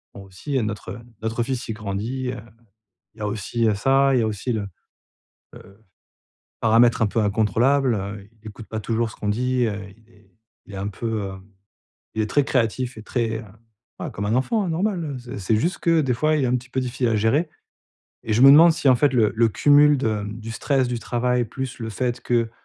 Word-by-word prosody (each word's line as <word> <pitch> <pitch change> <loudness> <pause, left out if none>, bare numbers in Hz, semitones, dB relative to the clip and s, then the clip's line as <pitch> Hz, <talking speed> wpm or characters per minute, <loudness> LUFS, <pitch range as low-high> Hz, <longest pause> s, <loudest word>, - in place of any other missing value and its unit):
bon 100 - -9
aussi 95 +10 -10
il - - 0
y - - +3
a - - -1
notre 105 +2 -5 0.2
notre 115 +1 -1
fils 130 -1 -4
il 110 - -3
grandit, 110 +5 -4
heu, 125 - -6 0.8
il - - -23
y - - -14
a 105 - -1
aussi, 110 +3 -2
heu, 105 - +2
ça, 135 +5 +3
il 125 - +3
y - - +1
a 110 - +1
aussi 110 +4 -3
le, 105 -2 -2 0.9
heu, 100 +2 -15 0.8
paramètre 115 +2 +4
un - - +4
peu 115 +2 -1
incontrôlable, 115 +6 +2
heu, 100 0 -6
il 110 - -9
écoute 110 +1 -11
pas 110 -1 -5
toujours 115 +1 -1
ce - - -12
qu'on 105 - -4
dit, 125 +3 +1
heu, 105 -2 -2 0.2
il 115 0 -26
est 105 -2 -24 0.4
il 105 - -11
est - - -6
un 100 +1 -3
peu, 105 +3 -6 0.2
heu, 95 -1 -5 0.8
il 110 - 0
est 105 - -4
très 145 - +3
créatif 125 -1 -1
et 110 - -9
très, 115 -1 -2
heu, - - -11 0.5
bah, - - -5
comme 100 +1 -4
un 110 - 0
enfant 205 - +1
hein, - - -3
normal, 180 0 -1
heu, 140 -4 -5
c'est 120 +2 -8
c'est 100 +3 +1
juste 170 - -1
que 165 -2 +2
des 130 -5 0
fois 155 +5 +1
il 140 - +1
est - - +2
un 125 +1 +2
petit 125 +1 -9
peu 130 - -1
difficile 125 -1 -1
à 110 - +1
gérer. 135 +10 +1 0.8
Et 110 - -2
je 120 - +3
me 135 - +10
demande 165 +4 +8
si 150 -3 0
en 130 - +6
fait 140 +1 +2
le 110 -4 +3
le 115 0 +3
cumul 145 +7 +5
de, 110 -5 -1
mmh, 105 +2 -7
du 115 - -7
stress 135 0 0
du 120 -1 -2
travail 125 +1 0
plus 130 +3 -6
le 115 - -4
fait 120 +2 -2
que, 115 -2 0
115 Hz, 240 wpm, -23 LUFS, 110-130 Hz, 0.9 s, me